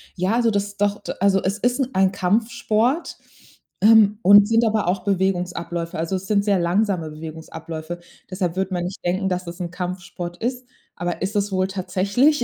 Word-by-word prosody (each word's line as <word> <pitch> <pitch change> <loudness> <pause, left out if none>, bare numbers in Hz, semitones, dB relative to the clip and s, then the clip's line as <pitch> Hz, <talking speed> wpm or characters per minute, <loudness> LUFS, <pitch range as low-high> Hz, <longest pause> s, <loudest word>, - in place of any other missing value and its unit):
Ja, 185 +4 0
also 235 -2 +2
das 200 0 -2
doch, 205 0 0
d - - -5
also 195 0 +3
es 195 +2 0
ist 245 +4 +1
'n 265 -1 0
ein 190 0 +3
Kampfsport, 225 - 0 0.6
ähm, 215 -1 +6
und 205 +2 +7
sind 230 +1 +3
aber 215 -4 +1
auch 180 0 0
Bewegungsabläufe. 175 -4 -1
Also, 165 +4 -2
es 190 +1 -5
sind 200 -1 +2
sehr 200 -3 +2
langsame 175 -2 0
Bewegungsabläufe. 160 +1 -7 0.3
Deshalb 180 -2 -2
wird 190 0 -1
man 175 -1 -1
nicht 185 - -7
denken, 190 +2 0
dass 180 -1 -3
es 170 +2 -7
'n 170 -1 -4
Kampfsport 180 -1 -5
ist. 250 +3 -3 0.3
Aber 175 -1 -3
ist 195 +3 -2
es 205 0 0
wohl 185 0 +1
tatsächlich 200 +9 +1
190 Hz, 185 wpm, -22 LUFS, 180-210 Hz, 0.6 s, und